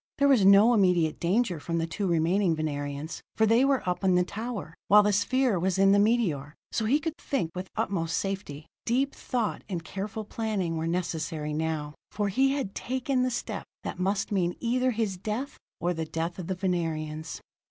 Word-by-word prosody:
There 280 Hz, -, +4 dB
was 265 Hz, -7 st, +5 dB
no 200 Hz, +5 st, +7 dB
immediate 180 Hz, -7 st, +3 dB
danger 185 Hz, 0 st, +1 dB
from 170 Hz, +3 st, -3 dB
the 165 Hz, -, 0 dB
two 195 Hz, +4 st, -3 dB
remaining 170 Hz, +2 st, +2 dB
Venerians, 145 Hz, 0 st, -4 dB
for 220 Hz, -, +4 dB
they 230 Hz, +4 st, +4 dB
were 275 Hz, -6 st, +1 dB
up 180 Hz, +2 st, -1 dB
in 185 Hz, -2 st, +4 dB
the 180 Hz, -, +4 dB
tower, 215 Hz, -3 st, -5 dB
while 210 Hz, +1 st, +7 dB
the 205 Hz, 0 st, +2 dB
sphere 250 Hz, 0 st, +2 dB
was 185 Hz, +1 st, 0 dB
in 195 Hz, 0 st, +5 dB
the 200 Hz, -, +5 dB
meteor; 185 Hz, -, +1 dB, 0.2 s
so 220 Hz, -, -1 dB
he 270 Hz, +7 st, +3 dB
could 320 Hz, 0 st, -3 dB
think 245 Hz, -13 st, -2 dB
with 185 Hz, +1 st, -6 dB
utmost 165 Hz, -4 st, -1 dB
safety. 190 Hz, -7 st, -4 dB, 0.2 s
Deep 265 Hz, +4 st, +1 dB
thought 240 Hz, -5 st, -2 dB
and 175 Hz, -4 st, -3 dB
careful 205 Hz, +6 st, -5 dB
planning 205 Hz, -6 st, -2 dB
were 160 Hz, 0 st, -2 dB
necessary 160 Hz, -3 st, -2 dB
now, 155 Hz, -1 st, -2 dB, 0.2 s
for 205 Hz, -1 st, -1 dB
he 270 Hz, +7 st, +3 dB
had 270 Hz, -9 st, -3 dB
taken 260 Hz, +1 st, -1 dB
the 255 Hz, -, +2 dB
step 240 Hz, -, -4 dB, 0.2 s
that -, -, -5 dB
must 195 Hz, +2 st, 0 dB
mean 180 Hz, -3 st, +1 dB
either 250 Hz, +2 st, +1 dB
his 220 Hz, -5 st, -1 dB
death 215 Hz, +9 st, -4 dB, 0.2 s
or 175 Hz, +1 st, 0 dB
the 160 Hz, -1 st, -3 dB
death 165 Hz, +3 st, -3 dB
of 175 Hz, -, -5 dB
the 190 Hz, -, -1 dB
Venerians. 165 Hz, -4 st, -2 dB
190 Hz, 195 wpm, -28 LUFS, 165-225 Hz, 0.2 s, no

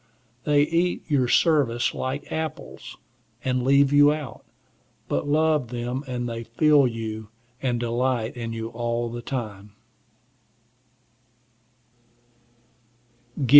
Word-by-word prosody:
They 145 Hz, -1 st, +4 dB
eat 170 Hz, +3 st, 0 dB
your 135 Hz, -4 st, +3 dB
service 135 Hz, -5 st, +3 dB
like 130 Hz, +2 st, -4 dB
apples, 160 Hz, 0 st, -5 dB, 0.5 s
and 130 Hz, -1 st, +1 dB
leave 140 Hz, +2 st, +4 dB
you 145 Hz, 0 st, +7 dB
out. 150 Hz, -4 st, -5 dB, 0.6 s
But -, -, -1 dB
love 155 Hz, -2 st, +2 dB
them, 120 Hz, +3 st, -3 dB
and 125 Hz, -1 st, -3 dB
they 115 Hz, 0 st, -4 dB
feel 140 Hz, +4 st, +4 dB
you, 110 Hz, -2 st, -5 dB, 0.3 s
and 125 Hz, -3 st, 0 dB
delight 120 Hz, 0 st, 0 dB
in 115 Hz, -1 st, -4 dB
you 115 Hz, 0 st, -4 dB
all 120 Hz, 0 st, -2 dB
the 120 Hz, 0 st, -5 dB
time. 105 Hz, -6 st, -5 dB
125 Hz, 105 wpm, -25 LUFS, 115-145 Hz, 0.6 s, you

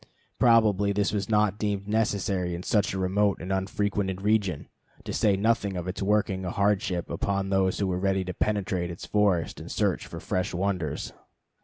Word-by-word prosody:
Probably 105 Hz, -4 st, +4 dB
this 100 Hz, +1 st, 0 dB
was 100 Hz, -1 st, -2 dB
not 105 Hz, -1 st, +2 dB
deemed 100 Hz, -2 st, -2 dB
necessary 100 Hz, -4 st, 0 dB
in 85 Hz, -, -6 dB
such 105 Hz, 0 st, +1 dB
a 95 Hz, -, -3 dB
remote 95 Hz, +2 st, +1 dB
and 90 Hz, +3 st, -3 dB
unfrequented 95 Hz, 0 st, -1 dB
region, 100 Hz, -7 st, +1 dB, 0.4 s
to -, -, -5 dB
say 100 Hz, -2 st, +2 dB
nothing 105 Hz, -2 st, +1 dB
of 90 Hz, 0 st, -4 dB
its 95 Hz, +2 st, -4 dB
working 100 Hz, -2 st, +1 dB
a 90 Hz, -, -2 dB
hardship 95 Hz, -3 st, 0 dB
upon 100 Hz, -1 st, -1 dB
those 95 Hz, -1 st, +2 dB
who 100 Hz, -, 0 dB
were 90 Hz, -1 st, -1 dB
ready 95 Hz, 0 st, +1 dB
to 90 Hz, -, -4 dB
penetrate 95 Hz, -3 st, -1 dB
its 85 Hz, -, -7 dB
forests 100 Hz, -7 st, +1 dB
and -, -, -9 dB
search -, -, 0 dB
for -, -, -7 dB
fresh 90 Hz, -1 st, -2 dB
wonders. 90 Hz, -5 st, -2 dB
100 Hz, 180 wpm, -27 LUFS, 95-105 Hz, 0.4 s, Probably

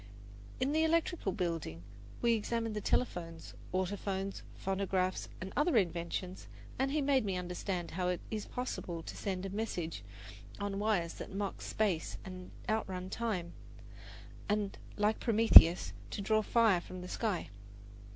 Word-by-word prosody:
In 260 Hz, +2 st, +1 dB
the 315 Hz, +1 st, +3 dB
electrical 330 Hz, -, +1 dB
building 165 Hz, -, -3 dB, 0.4 s
we 235 Hz, -1 st, +5 dB
examined 225 Hz, 0 st, -1 dB
the 210 Hz, -, -2 dB
telephones, 165 Hz, -8 st, -1 dB, 0.2 s
autophones, 195 Hz, +1 st, -2 dB
phonographs, 190 Hz, -1 st, -1 dB
and 185 Hz, +1 st, -6 dB
other 295 Hz, -2 st, +3 dB
inventions, 180 Hz, 0 st, -1 dB, 0.3 s
and 265 Hz, +1 st, +2 dB
he 295 Hz, +1 st, +1 dB
made 270 Hz, -3 st, +3 dB
me 195 Hz, -3 st, -1 dB
understand 180 Hz, 0 st, -3 dB
how 180 Hz, +2 st, -1 dB
it 180 Hz, -1 st, 0 dB
is 215 Hz, -2 st, -3 dB
possible 175 Hz, -9 st, -4 dB
to -, -, -7 dB
send 190 Hz, -2 st, -3 dB
a 195 Hz, -, -4 dB
message 180 Hz, -, -3 dB, 0.6 s
on 200 Hz, -1 st, -2 dB
wires 205 Hz, -6 st, +1 dB
that -, -, -6 dB
mock 200 Hz, -1 st, -3 dB
space 195 Hz, -7 st, -1 dB
and 185 Hz, -1 st, -8 dB, 0.2 s
outrun 190 Hz, -4 st, -2 dB
time, 190 Hz, -7 st, -2 dB, 1.0 s
and, 205 Hz, -1 st, 0 dB, 0.2 s
like 210 Hz, +1 st, +2 dB
Prometheus, 220 Hz, -7 st, +8 dB, 0.2 s
to -, -, -5 dB
draw 215 Hz, +2 st, +3 dB
fire 215 Hz, -4 st, +4 dB
from 185 Hz, +1 st, -8 dB
the 180 Hz, -, -7 dB
sky. 200 Hz, -, -2 dB
195 Hz, 140 wpm, -33 LUFS, 180-220 Hz, 1.0 s, Prometheus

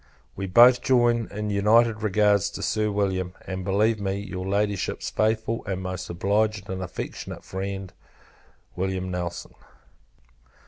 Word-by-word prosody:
We 95 Hz, 0 st, -4 dB
both 120 Hz, +6 st, +7 dB
join 120 Hz, -3 st, +3 dB
in 105 Hz, 0 st, -4 dB
united 110 Hz, +2 st, +3 dB
regards 105 Hz, -1 st, +3 dB
to -, -, -6 dB
Sir 105 Hz, 0 st, 0 dB
William; 95 Hz, -3 st, -1 dB
and 95 Hz, -1 st, -4 dB
believe 105 Hz, +4 st, +2 dB
me, 95 Hz, -1 st, -1 dB
your 95 Hz, -2 st, -5 dB
Ladyship's 100 Hz, 0 st, -1 dB
faithful 110 Hz, +1 st, 0 dB
and 95 Hz, -1 st, -3 dB
most 95 Hz, -1 st, -5 dB
obliged 100 Hz, +3 st, 0 dB
and 95 Hz, 0 st, -4 dB
affectionate 90 Hz, -2 st, -6 dB
friend, 95 Hz, 0 st, -5 dB, 0.8 s
Wm. 95 Hz, 0 st, -2 dB
NELSON. 90 Hz, -1 st, -5 dB
100 Hz, 130 wpm, -25 LUFS, 95-110 Hz, 0.8 s, both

